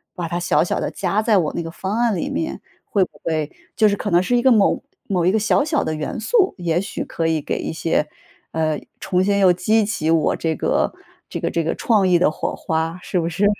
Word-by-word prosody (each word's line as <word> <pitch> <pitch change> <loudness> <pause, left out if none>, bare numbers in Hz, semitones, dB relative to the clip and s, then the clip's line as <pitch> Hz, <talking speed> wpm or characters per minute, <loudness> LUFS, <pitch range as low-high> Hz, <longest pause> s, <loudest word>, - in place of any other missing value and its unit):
把 175 -1 -3
它 170 +2 -2
小 175 -1 +2
小 175 - -1
地 - - -2
加 195 +3 0
在 215 -3 +4
我 155 -4 0
那 170 - -3
个 165 - -6
方 195 +5 -3
案 235 -3 +2
里 170 - -2
面， 320 - -3 0.2
会 200 -3 +2
不 - - -6
会 155 -2 -1 0.2
就 215 - +4
是 200 - +1
可 205 - -3
能 175 +1 +5
是 245 +6 +1
一 - - +2
个 265 - +5
某 210 -4 +3 0.2
某 180 -4 0
一 185 - +4
个 220 - +2
小 220 +6 +2
小 305 0 0
的 155 - -2
元 155 - -4
素， 385 - +2
也 170 -1 0
许 195 - -4
可 165 - -3
以 160 -1 +1
给 - - -3
一 - - -4
些 160 -2 0 0.4
呃， 155 -2 0 0.2
重 185 0 +1
新 200 0 +2
又 190 -2 +6
激 215 +5 +2
起 165 -7 -1
我 160 -2 +2
这 160 -1 -1
个 - - 0 0.4
这 - - -4
个 - - -1
这 165 - 0
个 160 - -1
创 210 -5 +2
意 175 -2 +4
的 180 - +4
火 - - -3
花， 165 +2 -2
是 180 - -1
不 165 - -1
是？ 190 +5 0
180 Hz, 270 characters per minute, -21 LUFS, 165-210 Hz, 0.4 s, 又